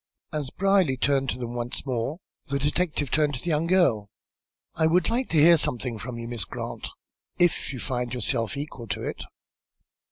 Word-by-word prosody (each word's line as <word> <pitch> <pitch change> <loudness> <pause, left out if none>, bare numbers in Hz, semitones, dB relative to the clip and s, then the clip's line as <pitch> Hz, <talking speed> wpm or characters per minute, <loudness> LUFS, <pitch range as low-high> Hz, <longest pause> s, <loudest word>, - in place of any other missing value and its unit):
As 150 -4 -2
Brierly 195 -8 +2
turned 135 0 +1
toward 125 - -3
them 120 0 -4
once 120 +3 -3
more 130 +3 -2 0.3
the 140 - -1
detective 145 0 0
turned 150 -2 +2
to - - -5
the 175 - -4
young 160 +1 +1
girl. 145 - +3 0.6
"I 160 0 +2
would 180 +6 +2
like 245 +2 0
to 165 - +1
hear 165 +3 +8
something 125 -5 +1
from 120 +2 -6
you, 115 0 -6
Miss 120 -4 -1
Grant, - - -5 0.5
if 175 -5 +2
you 135 - -5
find 125 -1 -2
yourself 120 +1 -1
equal 140 -5 -6
to - - -3
it." - - -4
140 Hz, 185 wpm, -26 LUFS, 120-160 Hz, 0.6 s, hear